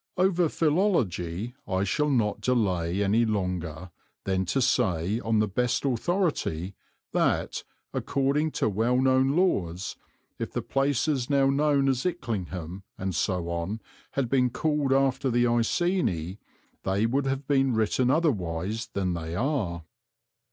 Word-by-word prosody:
Over 180 Hz, -2 st, +3 dB
philology 120 Hz, -, 0 dB
I 95 Hz, 0 st, 0 dB
shall 150 Hz, +10 st, +1 dB
not 115 Hz, -7 st, +1 dB
delay 100 Hz, -6 st, +1 dB
longer 90 Hz, -6 st, -1 dB, 0.3 s
than 95 Hz, -1 st, 0 dB
to 135 Hz, -, 0 dB
say, 105 Hz, -5 st, +1 dB
on 110 Hz, -2 st, 0 dB
the 105 Hz, 0 st, +3 dB
best 125 Hz, +7 st, 0 dB
authority, 135 Hz, -, 0 dB, 0.4 s
that, -, -, 0 dB, 0.3 s
according 140 Hz, +3 st, 0 dB
to -, -, +1 dB
well 115 Hz, +4 st, +1 dB
known 130 Hz, +1 st, +3 dB
laws, 95 Hz, -, 0 dB, 0.4 s
if -, -, -4 dB
the -, -, -2 dB
places 135 Hz, -1 st, 0 dB
now 135 Hz, -1 st, +3 dB
known 140 Hz, -1 st, +2 dB
as 130 Hz, -2 st, +1 dB
Icklingham 95 Hz, -, -3 dB, 0.2 s
and 95 Hz, 0 st, -3 dB
so 90 Hz, +1 st, -1 dB
on 85 Hz, +6 st, -3 dB, 0.3 s
had 135 Hz, -3 st, 0 dB
been 125 Hz, 0 st, +2 dB
called 150 Hz, +1 st, 0 dB
after 135 Hz, 0 st, +2 dB
the 120 Hz, 0 st, +3 dB
Iceni, 115 Hz, -, 0 dB, 0.4 s
they 95 Hz, +3 st, +1 dB
would 135 Hz, +4 st, 0 dB
have 135 Hz, +1 st, -2 dB
been 135 Hz, -3 st, +2 dB
written 110 Hz, +3 st, +2 dB
otherwise 110 Hz, -, 0 dB
than 95 Hz, -2 st, 0 dB
they 80 Hz, 0 st, -4 dB
are. 100 Hz, -, -1 dB
120 Hz, 130 wpm, -27 LUFS, 95-135 Hz, 0.4 s, Over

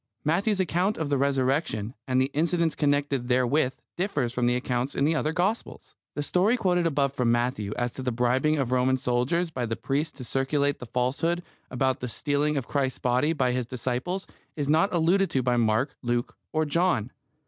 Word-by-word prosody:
Matthew's 195 Hz, +6 st, +1 dB
account 185 Hz, +3 st, +1 dB
of 160 Hz, -3 st, -2 dB
the 140 Hz, -, +2 dB
Resurrection 135 Hz, -5 st, 0 dB
and 130 Hz, 0 st, +2 dB
the 130 Hz, +2 st, +1 dB
incidents 165 Hz, +1 st, +1 dB
connected 145 Hz, -3 st, 0 dB
therewith 130 Hz, +2 st, +2 dB, 0.2 s
differs 145 Hz, -, -1 dB
from 125 Hz, -1 st, +1 dB
the 125 Hz, -, +2 dB
accounts 125 Hz, +1 st, -2 dB
in 140 Hz, -, +2 dB
the 160 Hz, -, +3 dB
other 155 Hz, -1 st, 0 dB
Gospels. 190 Hz, +7 st, -2 dB, 0.2 s
The 145 Hz, -, -2 dB
story 195 Hz, +10 st, +2 dB
quoted 180 Hz, -5 st, +2 dB
above 140 Hz, -3 st, +1 dB
from 125 Hz, -3 st, +1 dB
Matthew 120 Hz, -4 st, 0 dB
as 120 Hz, 0 st, -1 dB
to -, -, -6 dB
the 130 Hz, -1 st, -1 dB
bribing 125 Hz, +6 st, +2 dB
of 130 Hz, -4 st, -1 dB
Roman 130 Hz, +1 st, +2 dB
soldiers 130 Hz, +8 st, 0 dB
by 125 Hz, -5 st, -2 dB
the 115 Hz, -, -2 dB
priests 145 Hz, +5 st, -2 dB
to 130 Hz, -, -7 dB
circulate 140 Hz, +3 st, 0 dB
the 125 Hz, -, -8 dB
falsehood 145 Hz, +9 st, 0 dB, 0.3 s
about 130 Hz, +1 st, 0 dB
the 125 Hz, -, -4 dB
stealing 145 Hz, +4 st, 0 dB
of 135 Hz, -, -3 dB
Christ's 135 Hz, -3 st, -1 dB
body 125 Hz, +5 st, +1 dB
by 130 Hz, -6 st, +1 dB
His 125 Hz, -1 st, -2 dB
disciples 130 Hz, +9 st, -3 dB, 0.3 s
is 145 Hz, -2 st, -2 dB
not 160 Hz, +7 st, +3 dB
alluded 180 Hz, +3 st, +3 dB
to 130 Hz, -, 0 dB
by 125 Hz, 0 st, +2 dB
Mark, 120 Hz, +4 st, +1 dB
Luke, 120 Hz, -1 st, -1 dB, 0.2 s
or 155 Hz, 0 st, +1 dB
John. 150 Hz, -, +1 dB
140 Hz, 190 wpm, -26 LUFS, 125-160 Hz, 0.3 s, the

